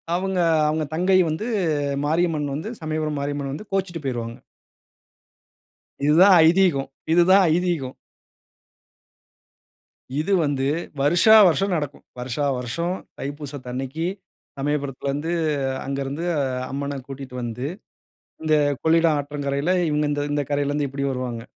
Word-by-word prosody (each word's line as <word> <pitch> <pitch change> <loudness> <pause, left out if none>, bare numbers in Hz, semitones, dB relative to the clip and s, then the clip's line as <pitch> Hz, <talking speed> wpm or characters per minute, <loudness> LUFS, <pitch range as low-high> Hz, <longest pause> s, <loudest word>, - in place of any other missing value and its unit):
அவுங்க 190 0 -1 0.3
அவுங்க 155 0 0
தங்கை 185 +2 +3
வந்து, 160 +9 -3 0.6
மாரியம்மன் 155 -3 0
வந்து 160 +9 -4
சமயபுரம் 155 -1 -2
மாரியம்மன் 140 -1 -3
வந்து, 205 +8 -8
கோச்சுட்டு 185 -4 -2
போயிருவாங்க. 120 -2 -4 1.7
இது 150 +1 +4
தான் 195 -1 +8
ஐதீகம் 170 -6 +3 0.2
இது 175 - +6
தான் 195 0 +7
ஐதீகம். 170 -7 -1 2.3
இது 175 +6 -1
வந்து, 140 -2 0 0.4
வருஷா 175 +9 +5
வருஷம் 195 +4 +1
நடக்கும். 145 -3 -5 0.2
வருஷா 125 +3 -3
வருஷம் 170 +9 -2 0.2
தைப்பூசத்து 145 -2 -6
அன்னைக்கு, 135 +5 -4 0.5
சமயபுரத்திலருந்து 140 +2 -2 0.5
அங்க 135 0 -3
இருந்து 145 +5 -4 0.5
அம்மன 140 0 -3
கூட்டிட்டு 135 -2 -8
வந்து, 120 +3 -4 0.8
இந்த 155 -1 +2 0.3
கொள்ளிடம் 165 -1 +3
ஆற்றங்கரையில, 145 +2 -2 0.2
இவங்க 150 0 +1
இந்த 145 - -1
இந்த 145 0 +1
கரையிலருந்து 145 0 0
இப்படி 140 +1 -4
வருவாங்க. 125 -3 -4
145 Hz, 115 wpm, -23 LUFS, 140-165 Hz, 2.3 s, தான்